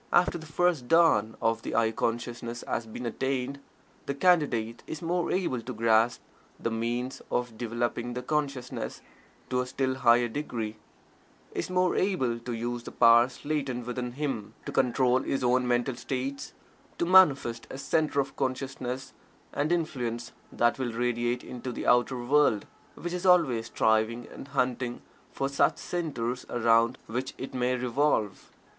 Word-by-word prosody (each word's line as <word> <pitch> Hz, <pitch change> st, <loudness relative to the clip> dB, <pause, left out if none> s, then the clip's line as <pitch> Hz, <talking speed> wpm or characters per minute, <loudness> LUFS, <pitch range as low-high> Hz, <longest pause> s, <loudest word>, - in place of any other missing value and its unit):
After 175 Hz, -1 st, +3 dB
the 160 Hz, -, -10 dB
first 165 Hz, -5 st, +1 dB
dawn 160 Hz, -10 st, +4 dB
of 115 Hz, 0 st, +2 dB
the -, -, -4 dB
"I" 115 Hz, -1 st, +3 dB
consciousness 120 Hz, +1 st, -3 dB
has 115 Hz, -, -2 dB
been 115 Hz, +3 st, -7 dB
attained, 130 Hz, +3 st, -2 dB, 0.5 s
the 140 Hz, -, -1 dB
Candidate 140 Hz, -9 st, +2 dB
is 160 Hz, -, -5 dB
more 175 Hz, +1 st, 0 dB
able 175 Hz, -10 st, 0 dB
to 125 Hz, +3 st, -6 dB
grasp 115 Hz, +1 st, +3 dB, 0.4 s
the 115 Hz, -, -2 dB
means 120 Hz, +3 st, -2 dB
of 120 Hz, -2 st, -1 dB
developing 120 Hz, +1 st, -2 dB
the 125 Hz, -, -4 dB
consciousness 140 Hz, -3 st, -3 dB, 0.5 s
to 125 Hz, 0 st, +2 dB
a 125 Hz, -, -4 dB
still 130 Hz, 0 st, -1 dB
higher 120 Hz, -2 st, +4 dB
degree 115 Hz, -4 st, -4 dB, 0.8 s
is -, -, -3 dB
more 185 Hz, 0 st, +2 dB
able 130 Hz, -12 st, +1 dB
to 120 Hz, +1 st, -6 dB
use 120 Hz, +1 st, -3 dB
the -, -, -9 dB
powers 120 Hz, +4 st, +4 dB
latent 135 Hz, -5 st, -2 dB
within 125 Hz, 0 st, -4 dB
him; 130 Hz, -7 st, -3 dB
to -, -, -4 dB
control 130 Hz, 0 st, +3 dB
his 135 Hz, 0 st, -2 dB
own 125 Hz, 0 st, +3 dB
mental 120 Hz, +2 st, +1 dB
states; 135 Hz, +2 st, -4 dB, 0.4 s
to -, -, +1 dB
manifest 145 Hz, -10 st, +5 dB
a -, -, -7 dB
Centre 150 Hz, +1 st, +1 dB
of 135 Hz, -, -7 dB
Consciousness 130 Hz, -1 st, -3 dB, 0.4 s
and 145 Hz, +3 st, 0 dB
Influence 125 Hz, -9 st, -2 dB, 0.2 s
that 120 Hz, +2 st, +2 dB
will 120 Hz, -3 st, -2 dB
radiate 120 Hz, +1 st, 0 dB
into 125 Hz, 0 st, -6 dB
the -, -, -5 dB
outer 125 Hz, +1 st, +3 dB
world 130 Hz, -5 st, +3 dB, 0.3 s
which 175 Hz, 0 st, -5 dB
is 180 Hz, +1 st, -1 dB
always 135 Hz, -11 st, +4 dB
striving 110 Hz, +2 st, +1 dB
and -, -, -10 dB
hunting 125 Hz, -3 st, -1 dB, 0.3 s
for 135 Hz, -, -1 dB
such 140 Hz, -, +2 dB
centres 130 Hz, -8 st, -3 dB
around 115 Hz, +1 st, +3 dB
which 125 Hz, +4 st, -4 dB
it 130 Hz, -, -6 dB
may 125 Hz, 0 st, +1 dB
revolve. 125 Hz, -3 st, 0 dB
125 Hz, 155 wpm, -28 LUFS, 120-140 Hz, 0.8 s, manifest